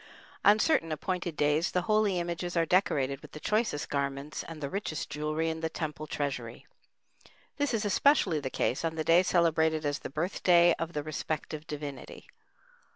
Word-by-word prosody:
On 205 +1 +7
certain 215 - +2
appointed 175 +1 -3
days 150 +3 +2
the 180 - 0
holy 215 -2 +2
images 175 0 -3
are 165 - +3
decorated 140 -7 +1
with - - -14
the 155 - -7
choicest 210 -6 0
garments 140 +1 -3
and 165 -2 -9
the 145 - -3
richest 160 -3 -4
jewelry 155 +2 -1
in 160 0 -2
the 160 0 -2
temple 155 -2 -5
treasury; 130 -6 -4 0.9
this 285 -2 0
is 225 -3 -1
especially 205 - +3
the 135 -2 -4
case 130 - -1
on 165 -1 -1
the 160 - -1
day 165 +3 +5
celebrated 160 -3 +2
as 145 -1 -1
the - - -7
birthday 175 +2 +3
of 165 +1 -3
the 150 - -2
respective 155 0 -4
divinity. 145 -3 -7
160 Hz, 170 wpm, -29 LUFS, 150-180 Hz, 0.9 s, On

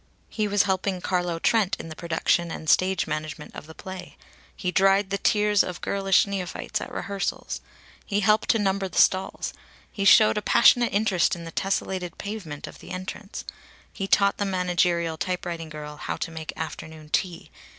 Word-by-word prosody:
He 215 -2 -1
was 205 -1 +3
helping 190 -1 0
Carlo 175 -2 -1
Trent 205 +2 +2
in 165 - -7
the 155 - -8
production 170 +1 0
and 160 - -7
stage 185 +3 +3
management 155 0 -5
of - - -9
the 160 - -12
play. 190 -2 -9 0.4
He 180 - -2
dried 195 +1 +3
the 200 - 0
tears 210 -1 +3
of 180 -1 -5
girlish 195 -1 +3
neophytes 195 -3 -3
at - - -7
rehearsals. 200 -1 -3 0.4
He 205 0 -1
helped 210 +1 +3
to - - +5
number 195 -2 0
the 180 - -8
stalls. 190 0 +2 0.4
He 200 - -3
showed 215 +1 +6
a - - -8
passionate 240 +2 +5
interest 200 -6 +2
in 170 - -9
the 165 - -7
tessellated 190 -1 -2
pavement 200 -8 -6
of - - -11
the - - -12
entrance. 185 +2 -6 0.5
He 195 -2 -4
taught 200 0 +3
the - - 0
managerial 175 -3 +1
typewriting 175 -2 -3
girl 150 -1 -8
how - - -4
to - - -4
make 160 -1 -6
afternoon 155 -1 -7
tea. 175 +1 -2
185 Hz, 175 wpm, -25 LUFS, 165-200 Hz, 0.5 s, showed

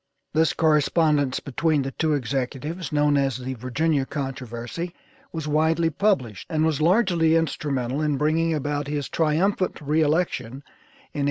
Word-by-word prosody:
This 160 +1 +3
correspondence 150 -3 +2
between 150 +1 0
the 135 - -4
two 155 +2 0
executives 135 +5 -3
known 145 -1 +3
as 135 -3 +1
"The 130 +1 -5
Virginia 135 +5 0
Controversy" 135 +4 -5 0.4
was 160 -2 -5
widely 160 +2 +2
published, 140 - 0
and 155 -2 +1
was 155 -2 0
largely 170 -3 +3
instrumental 140 -4 -1
in 150 -2 0
bringing 160 +3 +1
about 145 -1 -2
his 145 -1 -2
triumphant 175 +5 0
re 155 +1 +1
election 145 -5 0
in - - -18
1840. - - -2
150 Hz, 145 wpm, -24 LUFS, 135-160 Hz, 0.4 s, This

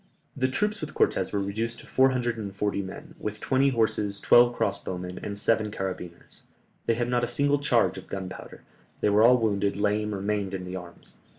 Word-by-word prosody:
The 130 -1 +1
troops 210 +12 -1
with - - -6
Cortès - - +1
were 100 - 0
reduced 110 +4 -3
to - - -15
four 130 0 +4
hundred 120 -2 -1
and 100 -3 -6
forty 100 0 -1
men, 95 -1 -9
with 105 0 -4
twenty 135 +3 +2
horses, 110 -4 0
twelve 120 0 +5
cross 100 0 -1
bowmen, 90 0 -5
and 100 -1 -5
seven 110 0 +1
carabineers; 95 -4 -6 0.5
they 115 - +3
had 120 +1 -1
not 120 0 +1
a - - +1
single 140 +4 +1
charge 115 -10 +2
of - - -14
gunpowder, 95 -1 -7 0.4
they - - +3
were 105 +1 +4
all 125 +3 +7
wounded, 100 -3 0
lame, 105 0 0
or - - -4
maimed 100 -1 -1
in 90 -1 -5
the 90 +1 -6
arms. 90 -2 -10
105 Hz, 205 wpm, -27 LUFS, 100-120 Hz, 0.5 s, all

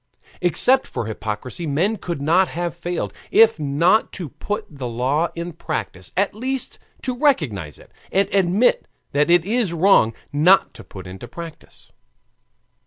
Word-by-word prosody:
Except 245 - +3
for - - -4
hypocrisy 110 - -5
men 180 +10 +1
could 170 -6 -5
not 175 +5 +4
have 175 0 -3
failed, 175 +1 -4 0.2
if 225 -4 +5
not 160 +9 +2
to 175 -6 -6
put 210 - -4
the 140 -5 -6
law 130 +8 0
in 170 0 -5
practice, 150 - -5
at 200 +1 +2
least 260 +4 -3 0.2
to 255 -1 -2
recognize 115 - 0
it, - - -18 0.2
and 195 +1 +2
admit 195 +5 +2 0.2
that 145 +3 +2
it 175 -1 +5
is 215 -4 0
wrong 165 - +4 0.2
not 175 +7 +4
to - - -11
put 95 -1 -11
it 90 +1 -10
in 120 - -8
practice. 165 +2 -11
170 Hz, 155 wpm, -21 LUFS, 140-200 Hz, 0.2 s, if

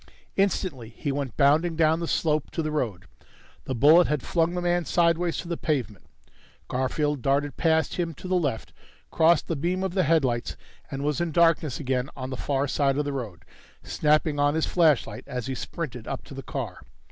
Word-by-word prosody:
Instantly 180 - 0
he 140 +5 -4
went 135 -4 -4
bounding 155 +4 +3
down 160 0 +3
the 170 - -3
slope 155 -3 0
to 165 - -3
the 155 - -2
road. 110 -11 -2 0.6
The 130 - -3
bullet 155 +8 +6
had 150 -3 -1
flung 170 0 0
the 180 - -1
man 175 0 +1
sideways 170 0 +2
to 170 - -5
the 170 -1 -3
pavement. 125 - -2 0.6
Garfield 140 +2 -1
darted 140 +2 0
past 160 -3 +1
him 170 -3 -2
to 185 - -9
the 185 - -1
left, 145 -11 -1 0.4
crossed 165 0 +3
the 165 - -1
beam 175 +6 -1
of 190 -2 -2
the 190 - +2
headlights, 135 -8 +1 0.3
and 135 0 -4
was 150 +3 0
in 170 -1 -1
darkness 165 -4 +2
again 130 -2 -1
on 130 -1 -6
the - - -3
far 140 +1 -1
side 135 0 +1
of 150 - 0
the 145 - -2
road, 105 -10 -6 0.4
snapping 150 0 +1
on 145 +1 +3
his 160 - +1
flashlight 150 - +2
as 125 -2 -4
he 135 - -3
sprinted 125 -4 -6
up 135 - -4
to - - -12
the 135 - -6
car. 125 -9 -5
150 Hz, 195 wpm, -26 LUFS, 130-165 Hz, 0.6 s, bullet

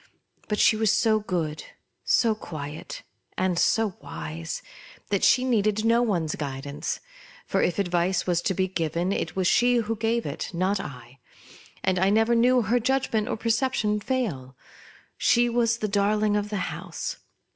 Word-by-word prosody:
But 210 - -1
she 220 - +5
was 215 -1 +2
so 220 -1 +3
good, 165 -7 -3 0.4
so 230 -2 +3
quiet, 155 -7 -7 0.3
and 185 -2 +1
so 220 -4 +2
wise, 80 0 -6 0.5
that 200 - +1
she 255 +1 +4
needed 215 -3 +1
no 230 +1 +4
one's 175 -10 0
guidance; 145 +1 -4 0.4
for - - 0
if 175 - +1
advice 180 -1 +1
was 175 -1 +1
to 190 - -1
be 190 +1 +1
given, 170 0 -1
it - - -2
was 190 -1 0
she 245 +6 +4
who 225 -1 0
gave 225 +2 0
it, - - -4
not 190 +3 +1
I; 135 -5 -9 0.6
and 185 -1 +1
I 190 +1 +3
never 225 +3 +3
knew 245 +1 +4
her 235 +5 +2
judgment 240 -3 0
or - - -2
perception 225 -2 0
fail. 175 - -3 0.6
She 240 0 +3
was 235 -1 +1
the 215 - -2
darling 210 +1 +1
of 205 0 -1
the 210 - -2 0.2
house. - - -5
205 Hz, 160 wpm, -26 LUFS, 175-225 Hz, 0.6 s, she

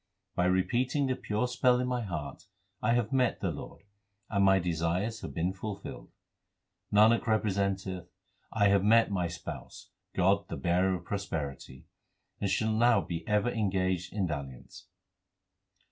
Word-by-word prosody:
By 90 - +1
repeating 120 +10 +1
the 130 -1 0
pure 110 0 -1
spell 125 0 +3
in 125 - 0
my 125 -1 -1
heart 80 -9 -5 0.4
I 115 +2 +2
have 120 0 0
met 130 -2 +2
the - - -1
Lord, - - -9 0.5
and 100 -2 +2
my 95 0 +6
desires 90 +5 -1
have - - -6
been 90 +2 0
fulfilled. 100 +1 -7 0.8
Nanak 110 +3 +5
representeth, 100 -4 0 0.4
I 100 -2 +3
have 100 -1 +3
met 115 +1 +5
my 90 -3 0
Spouse, 85 -1 -8 0.2
God 95 +2 +2
the - - -5
Bearer 90 +2 +2
of 90 - -8
prosperity; 75 -9 -5 0.5
and 100 - -1
shall 110 +2 +1
now 120 +2 +4
be 85 -1 -5
ever 105 +2 +2
engaged 95 -5 0
in 100 -2 -1
dalliance. 70 -6 -7
100 Hz, 145 wpm, -30 LUFS, 90-110 Hz, 0.8 s, my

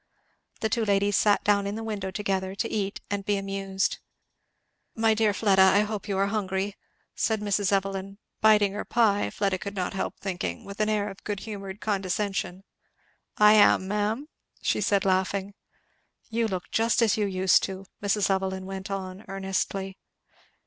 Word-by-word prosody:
The 220 - +1
two 230 0 0
ladies 200 -1 +2
sat 205 -1 +3
down 200 -1 +2
in 200 - -3
the 225 - -5
window 205 -4 -3
together 190 -1 -2
to 225 - -1
eat 200 -2 -3
and 200 -1 -1
be 205 0 0
amused. 195 -1 -2 1.0
"My 225 0 +3
dear 215 -1 +2
Fleda, 195 -2 +3
I 190 +2 +6
hope 210 -1 -4
you 195 -2 -1
are 195 - +3
hungry!" 200 -1 -2 0.4
said 220 -1 0
Mrs. 205 -1 0
Evelyn, 195 0 -1 0.2
biting 210 -2 +5
her 205 - -3
pie 215 -4 +2
Fleda 195 -2 -1
could 200 0 -6
not 185 0 -2
help 195 - -3
thinking 175 - -4
with 200 +1 -9
an 215 0 +2
air 210 -1 +1
of 195 -1 -9
good 205 -2 -4
humoured 200 -2 -7
condescension. 195 -2 -2 0.7
"I 210 0 +7
am, 205 -3 +5
ma'am," 210 +7 -1 0.4
she - - +1
said 200 -2 +2
laughing. 190 +1 0 0.8
"You 230 0 +1
look 185 -4 -5
just 230 +1 +2
as 220 - +3
you 210 -2 0
used 185 -1 +3
to 190 0 -6
do," - - -20 0.2
Mrs. 205 0 +1
Evelyn 190 0 -1
went 190 0 -6
on 190 0 -5
earnestly. 195 0 -3
200 Hz, 170 wpm, -27 LUFS, 190-210 Hz, 1.0 s, I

